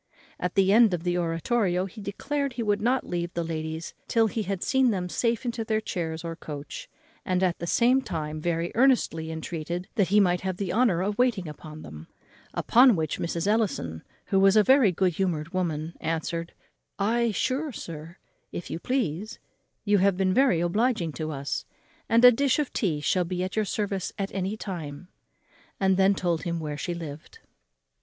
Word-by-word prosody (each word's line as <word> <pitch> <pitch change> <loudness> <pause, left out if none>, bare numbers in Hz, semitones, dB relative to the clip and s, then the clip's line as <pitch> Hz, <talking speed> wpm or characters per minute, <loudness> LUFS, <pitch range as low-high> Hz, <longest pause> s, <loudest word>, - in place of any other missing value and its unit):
At 180 0 -2
the 195 0 +4
end 220 -4 +6
of 165 - -7
the 175 -1 0
oratorio 180 +3 0
he 210 +3 -10
declared 275 +7 -2
he 240 -1 -3
would 205 -1 +1
not 250 +4 +1
leave 175 -1 -3
the 170 - 0
ladies 160 0 -4
till 230 -1 +3
he 220 +1 -1
had 195 -2 -3
seen 265 -1 +3
them 185 -5 -1
safe 230 +6 -1
into 235 -1 -2
their 220 0 0
chairs 165 -6 -4
or 165 -1 -4
coach; 160 - -8 0.3
and 185 -1 0
at 180 -2 +1
the 170 - -4
same 250 +7 +4
time 155 -7 -4
very 170 +1 -1
earnestly 230 -11 +2
entreated 165 +2 -4
that 200 -6 +2
he 205 +4 +4
might 180 -3 +3
have 185 -1 -3
the 190 -3 -2
honour 215 -8 +3
of 205 +3 -2
waiting 230 -8 +2
on 155 +1 -9
them. 75 +1 -10 0.5
Upon 245 -1 +5
which 155 -3 -2
Mrs. 170 0 -2
Ellison, 200 - 0 0.2
who 195 - +2
was 195 +1 +5
a 215 - +6
very 260 -4 +5
good 180 0 +1
humoured 170 -2 -2
woman, 165 -3 -2
answered, 165 +1 -3 0.4
"Ay, 235 +4 +1
sure, 270 - -1
sir, 165 -4 -8 0.3
if 175 - -6
you - - -3
please; 215 - -2 0.5
you 205 -1 +4
have 195 0 +3
been 185 -1 +2
very 225 -9 +3
obliging 205 0 +1
to 155 +1 -4
us; 140 -2 -3 0.5
and 230 +2 +6
a 250 - +11
dish 270 +2 +2
of 300 -3 -2
tea 160 -9 0
shall 180 +4 +2
be 180 +1 -3
at 185 - -4
your 215 -1 +1
service 200 -3 -2
at 195 -1 -3
any 195 +2 -2
time;" 170 -5 -6 0.7
and 190 -1 +3
then 195 +1 +4
told 175 -3 0
him 170 -1 -2
where 150 -2 -4
she 175 +4 -3
lived. 155 -3 -8
185 Hz, 190 wpm, -26 LUFS, 165-220 Hz, 0.7 s, a